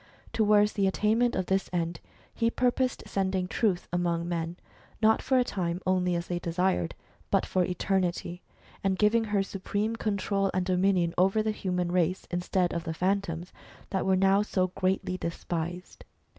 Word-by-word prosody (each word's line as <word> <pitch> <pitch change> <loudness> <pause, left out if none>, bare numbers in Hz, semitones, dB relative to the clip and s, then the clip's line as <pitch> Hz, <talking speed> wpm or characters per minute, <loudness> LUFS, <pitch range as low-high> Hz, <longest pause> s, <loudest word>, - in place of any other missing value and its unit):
Towards 210 -1 +4
the 200 -2 +2
attainment 220 +5 +2
of 185 - 0
this 190 +1 0
end, 170 -2 -2 0.3
he 230 -1 +1
purposed 250 +1 0
sending 190 -1 -1
Truth 195 -3 0
among 170 -1 0
men, 170 0 -3 0.4
not 220 0 +4
for 260 - +2
a 250 - +5
time 175 -7 -2
only 180 -1 +2
as 170 0 -2
they 175 -1 -2
desired, 170 - 0 0.3
but - - +2
for 185 - +1
eternity, 180 -1 -1 0.4
and 190 -1 +1
giving 220 +2 +3
her 205 -2 +1
supreme 205 +3 -2
control 200 -2 0
and 185 -1 +1
dominion 180 -2 +2
over 195 +4 +3
the 215 - 0
human 180 -4 -2
race, 180 0 +1
instead 175 0 0
of 170 - -2
the 160 -1 -4
Phantoms 180 -2 -1 0.4
that 190 -2 0
were 190 0 +3
now 195 +1 +4
so 185 -3 0
greatly 185 0 -1
despised. 170 +1 -4
185 Hz, 160 wpm, -28 LUFS, 175-205 Hz, 0.4 s, a